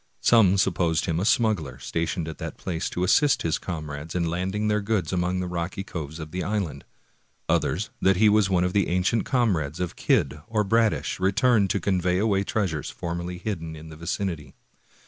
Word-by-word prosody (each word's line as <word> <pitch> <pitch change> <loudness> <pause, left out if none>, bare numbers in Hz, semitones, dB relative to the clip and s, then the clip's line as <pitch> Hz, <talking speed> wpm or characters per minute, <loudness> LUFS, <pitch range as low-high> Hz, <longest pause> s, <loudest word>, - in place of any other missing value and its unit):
Some 100 -5 +5
supposed 85 -4 +1
him 85 -2 0
a 95 - -1
smuggler 105 - +1
stationed 80 +4 -2
at 80 - -7
that - - -6
place 85 -1 -3
to 90 - -2
assist 140 +9 +3
his 80 -1 0
comrades 75 -2 -6
in 85 -1 +1
landing 95 +5 -1
their 105 0 +1
goods 100 -5 -1
among 90 +1 0
the 90 - -3
rocky 90 +2 -3
coves 80 -4 -6
of 80 -2 -8
the 90 +1 -3
island. 95 -9 -3 0.6
Others, 95 +7 0
that 95 0 +4
he 110 +2 +5
was 105 -1 +4
one 90 -2 +2
of 90 0 0
the 100 -2 +2
ancient 90 +5 +1
comrades 90 - 0
of 90 -2 -3
Kidd 70 +2 +1
or 110 -1 +1
Bradish, 110 0 +1
returned 100 +2 +3
to 100 - +1
convey 90 -1 +1
away 100 -1 +2
treasures 95 -9 -2
formerly 85 +1 -5
hidden 85 -4 -4
in 80 +1 -10
the 80 - -10
vicinity. 80 -3 -4
90 Hz, 185 wpm, -25 LUFS, 80-100 Hz, 0.6 s, Some